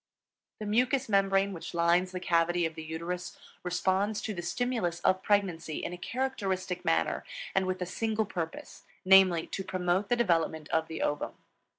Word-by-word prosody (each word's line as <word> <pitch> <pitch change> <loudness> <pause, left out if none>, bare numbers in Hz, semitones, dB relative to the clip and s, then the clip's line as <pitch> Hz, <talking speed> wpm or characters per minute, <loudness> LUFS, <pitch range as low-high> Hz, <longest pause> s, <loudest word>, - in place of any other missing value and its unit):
The 215 - -6
mucous 250 +5 +2
membrane 195 -1 +2
which 170 0 -7
lines 170 +2 +3
the 185 - -4
cavity 175 0 +2
of 160 - -2
the 160 - -7
uterus 170 +3 -5 0.2
responds 190 +4 0
to 215 - -2
the 175 - -4
stimulus 180 -2 -1
of 185 +1 +2
pregnancy 180 -7 0
in - - -3
a - - -6
characteristic 190 -7 -2
manner 80 0 +1 0.3
and 190 -1 +2
with 185 0 -1
a - - -3
single 220 +3 -1
purpose, 170 -5 -6 0.2
namely, 185 -3 +6
to 195 - -5
promote 185 +1 0
the 245 - +4
development 165 -8 +1
of 160 0 +1
the 160 - -4
ovum. 145 - -1
185 Hz, 170 wpm, -30 LUFS, 170-200 Hz, 0.3 s, namely